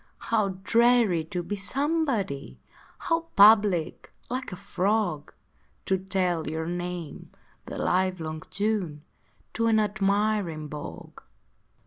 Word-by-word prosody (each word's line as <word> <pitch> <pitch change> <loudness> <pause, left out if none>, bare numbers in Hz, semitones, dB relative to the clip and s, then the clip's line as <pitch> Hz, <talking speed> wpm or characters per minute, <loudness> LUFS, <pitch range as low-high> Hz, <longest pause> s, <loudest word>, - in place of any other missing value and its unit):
How 205 -5 -1
dreary 230 -6 +4
to 175 +2 -4
be 205 - -3
Somebody! 235 - -1 0.4
How 330 0 -1
public 205 -5 +5 0.2
like 255 -2 -3
a - - -5
Frog 195 -4 -1 0.5
To 190 -1 +1
tell 185 -3 -1
your 160 +1 -3
name 175 -1 -5 0.4
the - - -6
livelong 180 -4 -1
June 190 -7 -2 0.5
To 230 0 0
an 220 -1 +4
admiring 200 -6 0
Bog! 145 - -9
195 Hz, 105 wpm, -27 LUFS, 170-215 Hz, 0.5 s, public